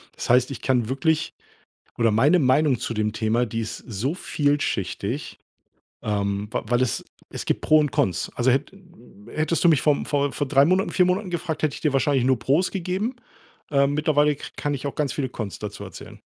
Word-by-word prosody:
Das - - -6
heißt, 125 +2 +4
ich 130 - -7
kann 125 -4 +1
wirklich 160 +5 0 0.7
oder 115 -2 +3
meine 145 +11 +4
Meinung 135 -2 +3
zu 115 - -4
dem 105 0 0
Thema, 110 +2 +1
die 115 +1 -3
ist 110 - -5
so 120 - -2
vielschichtig, 145 - -2 0.6
ähm, 100 -1 -1
w - - 0
weil 120 +1 +2
es 130 - -1 0.3
es - - -6
gibt - - 0
Pro 155 0 +5
und 150 -2 +1
Cons. 95 -5 0
Also 125 +1 +3
hät 135 +2 0 0.6
hättest 155 +3 -1
du - - +7
mich 155 -4 +4
vom 150 -2 +2
vor 145 -1 +1
vor 145 - -2
3 135 0 +5
Monaten, 185 +2 +2
4 180 - +3
Monaten 185 +1 0
gefragt, 170 -2 -3
hätte 150 -2 0
ich - - -8
dir 150 -3 +1
wahrscheinlich 135 -2 +2
nur 130 -2 +3
Pros 150 +10 +1
gegeben, 195 +7 -2 0.6
äh. 140 -1 +4
Mittlerweile 150 0 +2
ka - - -8
kann 145 0 -2
ich 140 - -5
auch - - -6
ganz 145 -3 0
viele 135 -3 -2
Cons 105 -7 -6
dazu - - -6
erzählen. - - -11
140 Hz, 200 wpm, -24 LUFS, 120-155 Hz, 0.7 s, du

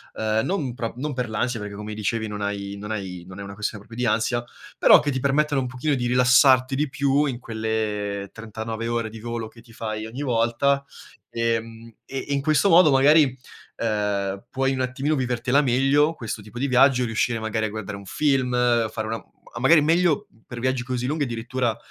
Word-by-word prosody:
uhm, 110 0 0
non 155 -10 -2
prop 115 -2 -5
non 145 +3 -3
per 125 -3 -3
l'ansia, 115 +2 -1
perché 105 -1 -6
come 105 +1 -6
dicevi 110 +1 -2
non 105 -1 -6
hai 100 -1 -3
non 105 +1 -8
hai 95 -5 -5
non 95 +1 -10
è - - -5
una 100 0 -8
questione 105 0 -5
proprio 120 +2 -5
di 120 - +3
ansia, 120 +2 0 0.4
però - - +8
che 145 - -1
ti 130 - -2
permettono 140 +1 +1
un 125 - -3
pochino 130 +4 -1
di 125 -3 -1
rilassarti 130 +1 +5
di 145 +1 0
più 140 +2 +1
in 130 -4 -2
quelle 110 -3 -3
39 115 0 -5
ore 115 -1 -1
di 110 - -9
volo 115 0 -4
che 115 +1 -16
ti 115 -1 -18
fai 110 -1 -4
ogni 125 +6 -6
volta, 125 +3 +1 0.5
ehm, 115 0 -3
e 135 - -6
e - - 0
in 140 - 0
questo 155 +5 +2
modo 170 -1 +7
magari, 145 +3 +6 0.5
uhm, 100 -3 -1
puoi 135 0 0
un 130 - -2
attimino 135 +4 -1
vivertela 125 +1 +1
meglio, 140 +4 +3
questo 115 -4 -5
tipo 105 +3 -12
di 130 - -1
viaggio, 125 -1 +4
riuscire 115 +1 0
magari 110 0 -1
a 110 - -2
guardare 105 -1 -6
un 100 - -12
film, 135 +1 +1 0.4
fare 110 0 -4
una 115 +1 -2
mhmm - - -19
a - - -4
magari 150 +6 +6
meglio 165 0 +2 0.2
per 120 - -7
viaggi 130 +1 0
così 125 0 -3
lunghi 150 +1 0
addirittura, 120 -1 -2
120 Hz, 205 wpm, -24 LUFS, 110-135 Hz, 0.5 s, però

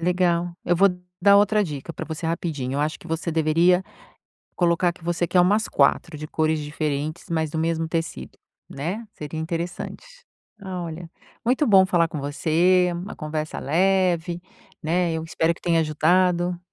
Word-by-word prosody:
Legal, 175 0 +1
eu 175 - +2
vou 195 +3 +6 0.3
dar 200 +1 +7
outra 210 +1 +4
dica 150 -1 -6
para - - -6
você 160 +1 -5
rapidinho, 160 -6 -2
eu 140 - 0
acho 150 +1 -1
que - - -14
você 165 +1 -2
deveria 165 +3 +3 0.7
colocar 175 0 +2
que 175 - -20
você 175 0 0
quer 180 +2 +3
umas 205 +5 +3
4, 160 -3 +1
de 155 - -6
cores 155 0 0
diferentes, 150 +1 -3
mas 160 -2 0
do 160 - -3
mesmo 165 0 0
tecido, 160 - -4 0.3
né, 180 +11 -4
seria 150 +1 -6
interessante. 170 - -4 0.6
Olha, 175 -3 -6 0.3
muito 255 +5 +2
bom 195 -3 +6
falar 170 -3 +2
com 155 - -5
você, 170 +5 +2
uma 175 +4 -6
conversa 155 -1 -4
leve, 175 +1 +1 0.4
né, 170 +1 +1
eu 160 0 -3
espero 165 0 0
que - - -20
tenha 165 -1 +2
ajudado 175 +3 +2
170 Hz, 160 wpm, -24 LUFS, 155-180 Hz, 0.7 s, dar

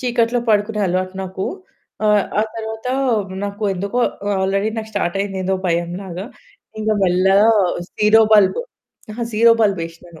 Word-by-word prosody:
చీకట్లో 240 -1 +1
పడుకునే 210 0 +1
అలవాటు 185 +1 -2
నాకు. 190 +1 -5 0.6
ఆహ్, 210 -1 +4 0.2
ఆ - - +3
తరువాత 220 +1 -6 0.6
నాకు 200 +2 -6
ఎందుకో 200 +6 -3 0.4
ఆల్రెడీ 195 +2 0
నాకు 220 0 -6
స్టార్ట్ 175 +2 -1
అయింది. 195 -1 -3
ఏదో 190 +1 +1
భయం 170 0 0
లాగా. 185 +1 -6 0.5
ఇంగ 215 0 -2
మెల్లగా 190 +4 +4 0.5
జీరో 215 +1 +6
బల్బ్, 210 - +5 0.7
జీరో 230 +2 +5
అహా! 230 - -3
బల్బ్ 200 -4 +2
వేసినాను. 165 -1 -13
200 Hz, 140 wpm, -19 LUFS, 185-220 Hz, 0.7 s, జీరో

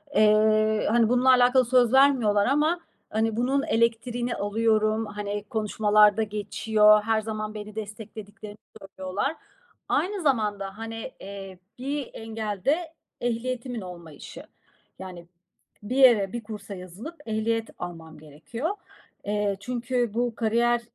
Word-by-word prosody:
Eee, 215 0 +4
hani, 230 -1 +4
bununla 250 +1 +3
alakalı 250 0 +5
söz 245 0 +3
vermiyorlar 245 -7 +4
ama, 305 +6 +2 0.3
hani, 220 0 0
bunun 270 +3 +1
elektriğini 235 +1 0
alıyorum. 215 +1 +1
Hani, 205 0 -4
konuşmalarda 210 0 +3
geçiyor. 210 0 +3
Her 220 0 +1
zaman 215 0 -4
beni 210 0 -8
desteklediklerini 210 0 -8 0.2
söylüyorlar. 195 +9 -3 0.5
Aynı 390 0 0
zamanda 210 -7 0
hani, 225 0 -6
eee, 195 -1 -9 0.2
bir 280 +1 -3
engel 220 -3 -5
de 320 +3 +1 0.3
ehliyetimin 245 0 -3
olmayışı. 170 -5 -10 0.6
Yani, 180 -2 -9 0.6
bir 240 +5 -4
yere, 230 -8 +5
bir 235 -2 -4
kursa 210 -2 -8
yazılıp 185 - -9
ehliyet 225 +1 -1
almam 165 -3 -8
gerekiyor. 160 - -5 0.6
Eee, 205 -1 0
çünkü 240 0 -2
bu 240 -1 -1
kariyer, 235 +1 +2
220 Hz, 115 wpm, -26 LUFS, 205-240 Hz, 0.6 s, alakalı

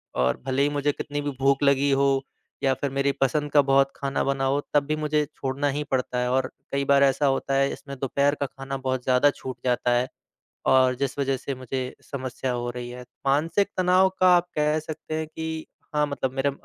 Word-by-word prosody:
और 65 0 +1
भले 135 +1 0
ही 145 - +3
मुझे 145 0 0
कितनी 145 0 -4
भी 145 - -2
भूख 140 +1 +3
लगी 140 0 +3
हो 135 0 +2 0.4
या 135 -1 +3
फिर 140 +1 -2
मेरी 140 +1 +1
पसंद 145 +2 +1
का 145 - +6
बहुत 135 0 +3
खाना 135 -1 -1
बना 135 0 0
हो, 140 +2 +1
तब 145 -1 +4
भी 155 +1 0
मुझे 150 -1 0
छोड़ना 135 +2 -1
ही 145 +2 -2
पड़ता 125 -1 0
है 125 0 0
और 130 0 +1 0.2
कई 140 0 0
बार 140 0 +5
ऐसा 140 +1 +3
होता 135 0 +1
है, 135 0 +2
इसमें 140 -1 -9
दोपहर 140 +2 +1
का 140 - -2
खाना 135 +1 -6
बहुत 130 -1 -2
ज़्यादा 130 +3 +4
छूट 130 -2 -7
जाता 125 0 +1
है 125 +1 0 0.6
और 130 -1 +5
जिस 140 +1 -2
वज़ह 135 -1 +1
से 135 +1 -5
मुझे 130 0 -4 0.3
समस्या 130 -1 -3
हो 120 0 -2
रही 120 0 -6
है। 125 0 -8 0.2
मानसिक 165 +8 +2
तनाव 185 +1 +4
का 185 - +6
आप 175 0 +1
कह 150 +1 +2
सकते 155 0 -6
हैं 160 0 -2
कि 160 0 -5 0.3
हाँ, 150 0 +3
मतलब 135 -2 -2
मेरा 140 +1 +1
140 Hz, 215 wpm, -25 LUFS, 130-145 Hz, 0.6 s, का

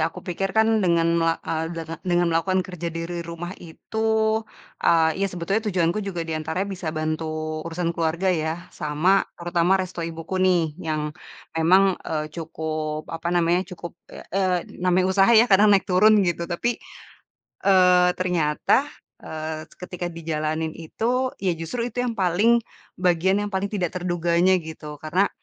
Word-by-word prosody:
aku - - -12
pikir, 195 +2 -1
kan, 220 0 +5
dengan 170 -3 +2
mela 165 0 +2
eee, 160 0 -1
denga 165 0 -5
dengan 175 -1 +1
melakukan 185 +3 +1
kerja 175 -2 -5
dari 165 +1 -4
rumah 170 +1 -6
itu, 220 +5 0 0.4
eee, 160 +1 +3
ya 195 - +2
sebetulnya 185 +4 -1
tujuanku 180 0 +1
juga 195 -4 -4
di 165 - -4
antaranya 160 +4 -2
bisa 180 -3 -5
bantu 155 0 -3
urusan 170 0 -2
keluarga 170 +3 0
ya, 160 -2 -1 0.2
sama, 155 +6 +2 0.2
terutama 175 +2 +2
resto 185 -2 -4
ibuku 165 +3 -4
nih, 185 -2 +4 0.2
yang 155 -3 -2 0.4
memang, 185 +4 +4 0.2
eee, 155 -1 -1
cukup, 155 -2 -4
apa 165 +1 -3
namanya, 175 +1 +3
cukup 170 -1 -8 0.2
ya, - - -11
eee, 185 -1 +2 0.2
namanya 180 0 +3
usaha 195 +1 +4
ya, - - +6
kadang 210 -2 +5
naik 195 - -2
turun, 205 +2 +5
gitu. 170 -1 -1
Tapi, 230 +7 -1 0.8
eee, 180 -2 +5
ternyata, 180 - +1 0.3
eee, 155 0 -6
ketika 180 -1 -5
dijalanin 160 -1 -3
itu, 245 +10 -1
ya, 185 -3 0
justru 165 +9 -4
itu 245 - -1
yang 240 -2 -2
paling 200 +6 +3 0.4
bagian 180 +1 +2
yang 205 - -7
paling 190 +1 -1
tidak 185 -5 -2
terduganya, 175 0 +2
gitu. 155 -3 -8
Karena, 170 +7 +1
175 Hz, 155 wpm, -24 LUFS, 160-190 Hz, 0.8 s, ya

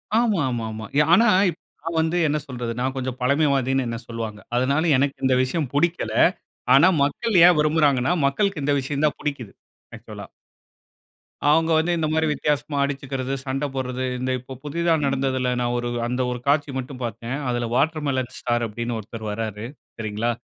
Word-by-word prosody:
ஆமா, 220 -7 +2
ஆமா, 115 -2 -3
ஆமா. 110 0 -6 0.3
ஆனா 230 +6 +6 0.2
இப் - - -7 0.2
நான் 165 0 -3
வந்து 165 +2 0
என்ன 150 +1 +1
சொல்றது, 120 -3 -4
நான் 130 +1 -1
கொஞ்சம் 130 -1 -4
பழமைவாதின்னு 135 -1 +2
என்ன 115 0 -3
சொல்வாங்க. 115 -2 -5 0.2
அதனால 140 +6 +1
எனக்கு 140 +1 +1
இந்த 130 -1 +3
விஷயம் 135 +1 -2
புடிக்கல. 170 +4 0 0.6
ஆனா 145 +7 +7
மக்கள் 185 +6 +2
ஏன் 180 -3 +6
விரும்புறாங்கனா, 150 -2 +2
மக்களுக்கு 170 +2 0
இந்த 145 0 +2
விஷயம் 145 +3 -2
தான் 150 - -2
புடிக்குது. 140 -8 -4 0.4
ஆக்சுவலா - - -10 1.2
அவங்க 165 +2 +3
வந்து 165 +2 +1
இந்த 155 -1 0
மாரி 160 0 +2
வித்தியாசமா 150 0 -1
அடிச்சுக்கறது, 135 -1 -3
சண்டை 135 +2 -2
போடறது, 130 -1 -3
இந்த 130 0 -1
இப்போ 130 +2 -10
புதிதா 165 +3 0
நடந்ததில, 130 -2 0
நான் 120 0 0
ஒரு 120 0 -2 0.2
அந்த 125 +1 -1
ஒரு 125 - -4
காட்சி 145 0 +2
மட்டும் 130 0 -6
பார்த்தேன். 115 +2 -4
அதில 120 -1 -1
வாட்டர்மெலன் 140 -4 0
ஸ்டார் 120 -1 0
அப்டின்னு 120 +2 -4
ஒருத்தர் 110 +1 -8
வர்றாரு. 110 0 -4 0.3
சரிங்களா? 110 +2 -1
135 Hz, 160 wpm, -23 LUFS, 120-150 Hz, 1.2 s, ஆனா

